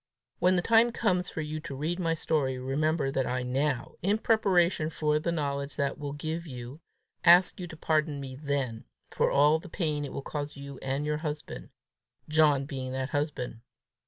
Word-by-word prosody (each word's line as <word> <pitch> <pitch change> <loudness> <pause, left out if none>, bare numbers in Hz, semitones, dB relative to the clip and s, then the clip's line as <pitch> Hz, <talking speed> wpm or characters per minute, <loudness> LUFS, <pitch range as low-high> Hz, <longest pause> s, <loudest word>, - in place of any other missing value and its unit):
When 185 +1 +4
the 175 - +1
time 230 +1 +5
comes 185 -6 0
for 160 - -4
you 155 0 -4
to 140 -2 -7
read 160 +6 -2
my 165 -2 +1
story, 145 -5 0
remember 140 +2 0
that 135 -1 0
I 125 0 -1
now, 130 0 -1
in 200 +4 +2
preparation 190 -8 +2
for 150 -1 +1
the 170 +2 -1
knowledge 140 -3 -2
that 140 -1 -1
will 145 -1 -4
give 160 +3 -4
you, 125 +2 -8 0.4
ask 175 +2 +6
you 180 - -5
to 160 - -10
pardon 155 -2 0
me 135 -2 -6
then 135 -5 -2 0.3
for - - +3
all 150 +3 +4
the 170 - -11
pain 155 -4 -1
it 140 - -5
will 140 - -5
cause 145 0 -5
you 140 -1 -8
and 135 +2 -2
your 150 0 0
husband 150 -1 -5 0.6
John 150 -3 +4
being 130 -2 -5
that 130 0 -2
husband. 145 -6 -3
150 Hz, 190 wpm, -29 LUFS, 140-165 Hz, 0.6 s, ask